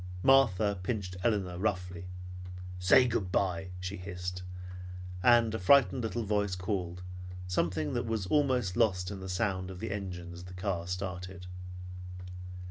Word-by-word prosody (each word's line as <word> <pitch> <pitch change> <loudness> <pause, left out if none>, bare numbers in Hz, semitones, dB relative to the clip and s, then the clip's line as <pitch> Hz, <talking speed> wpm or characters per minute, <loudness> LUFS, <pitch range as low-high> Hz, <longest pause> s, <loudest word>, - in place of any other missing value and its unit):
Martha 110 -7 +5
pinched 90 -2 -2
Elinor 95 -6 +1
roughly. 90 -3 -1 0.7
"Say 95 +8 +7
good 105 -6 0
bye!" 95 -1 +1
she 90 +2 -4
hissed, 90 -1 -4 0.8
and 120 0 +6
a 110 - -1
frightened 125 +3 +6
little 115 +1 -1
voice 105 -2 +1
called, 90 -2 -2 0.4
something 85 -4 0
that 120 -1 -1
was 110 -4 0
almost 125 -6 +2
lost 95 -5 +2
in 100 - -5
the 95 0 -6
sound 95 -1 0
of 95 -1 -7
the - - -3
engine 90 -3 -4
as 90 +1 -9
the 90 0 -9
car 90 -2 -1
started. 90 0 -4
95 Hz, 140 wpm, -32 LUFS, 90-110 Hz, 0.8 s, Say